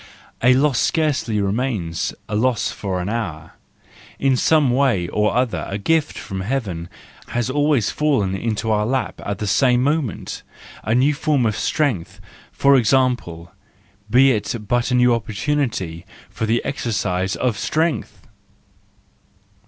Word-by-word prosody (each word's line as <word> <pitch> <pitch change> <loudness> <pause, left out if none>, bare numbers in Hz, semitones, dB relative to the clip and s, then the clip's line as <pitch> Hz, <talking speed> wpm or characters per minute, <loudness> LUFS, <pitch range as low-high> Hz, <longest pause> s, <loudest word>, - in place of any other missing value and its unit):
A 125 +2 +5
loss 135 -1 +2
scarcely 150 -9 0
remains 100 -5 -1 0.2
a 105 - -3
loss 120 +1 +1
for 95 -3 -3
an 90 - -4
hour: 90 -9 -4 0.7
in 135 -1 +2
some 145 0 +3
way 125 -9 +2
or 105 +4 0
other 125 -2 0
a 100 - -3
gift 155 +8 0
from 95 -1 -5
heaven 95 -7 -3 0.4
has 120 +1 -2
always 145 -5 +2
fallen 135 -11 +1
into 110 +2 -2
our 105 -1 +2
lap 130 +1 -2
at 100 -1 -3
the 105 - -4
same 125 +4 +3
moment—a 135 -5 -3
new 135 +4 +3
form 145 -4 +1
of 110 -2 0
strength, 100 - -1 0.3
for 140 0 +4
example: 120 -9 +1 0.6
be 130 +4 +5
it 110 +1 -1
but 120 +2 +1
a 125 - +1
new 125 -1 +4
opportunity 110 - -2 0.3
for 110 - -3
the 115 +2 0
exercise 95 -8 -1
of 125 -4 0
strength! 155 +2 -2
120 Hz, 135 wpm, -21 LUFS, 100-135 Hz, 0.7 s, A